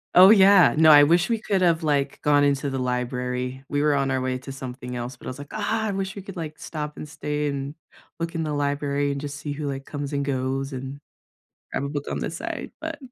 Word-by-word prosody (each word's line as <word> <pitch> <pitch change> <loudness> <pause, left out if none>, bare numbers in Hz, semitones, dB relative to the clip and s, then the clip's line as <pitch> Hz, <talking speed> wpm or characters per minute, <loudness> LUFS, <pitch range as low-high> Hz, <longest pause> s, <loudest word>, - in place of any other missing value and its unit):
Oh, 185 +3 +10
yeah 195 -3 +7
no, 160 +1 +6
I 145 -1 +9
wish 170 +6 +3
we 230 - +2
could 200 -3 0
have, 165 -2 +3
like, 145 -2 0
gone 145 -1 +4
into 140 -1 +1
the 135 - -2
library, 125 +1 -2
we 145 0 0
were 150 - +3
on 135 -1 +1
our 130 - +1
way 130 0 -2
to 135 +1 -9
something 125 -1 -7
else, 120 +1 -5
but - - -12
I - - -2
was 130 - -6
like, 145 0 -10
"Ah! 220 +1 -1
I - - -1
wish 195 0 -3
we 200 - -7
could," 195 -2 -9
like, 155 -3 -6
"stop, 150 -2 -6
and 150 - -7
stay, 150 0 -3
and 140 +1 -4 0.4
look 165 +1 -3
in 165 - -2
the 155 -1 -2
library 145 0 0
and 140 0 -4
just 145 0 -5
see 145 0 -5
who," 145 0 -4
like, 135 -1 -4
"comes 145 -1 -5
and 140 0 -1
goes 135 0 -2
and 135 +2 -6 0.7
have 140 - -1
a - - -3
book 145 0 -4
on - - -2
the - - -2
side." - - -5
But - - -5
145 Hz, 250 wpm, -24 LUFS, 135-155 Hz, 0.7 s, Oh